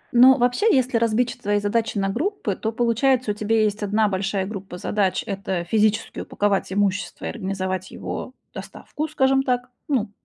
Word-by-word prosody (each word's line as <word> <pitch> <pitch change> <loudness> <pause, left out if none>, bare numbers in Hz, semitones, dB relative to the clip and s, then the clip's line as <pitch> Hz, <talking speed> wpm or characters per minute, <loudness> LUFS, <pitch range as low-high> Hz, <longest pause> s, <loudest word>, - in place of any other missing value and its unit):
Ну, 255 +2 +8
вообще, 245 - +2
если 255 -5 +2
разбить 230 +2 +2
ч - - -7
твои 205 0 +1
задачи 220 +2 -1
на 195 -1 +1
группы, 270 - -2
то, 220 - -3
получается, 240 +1 +2
у - - -1
тебя 215 +1 +1
есть 210 0 -1
1 210 +1 +2
большая 195 0 -1
группа 195 -3 -7
задач- 190 0 0
это 195 -4 -3
физически 215 +4 +1
упаковать 200 -2 -1
имущество 200 0 -1
и - - -2
организовать 185 -3 -3
его 255 - -6 0.2
доставку, 305 +1 -6
скажем 270 -3 +2
так, 250 -1 -1 0.2
ну, 250 -8 0
215 Hz, 170 wpm, -23 LUFS, 195-245 Hz, 0.2 s, Ну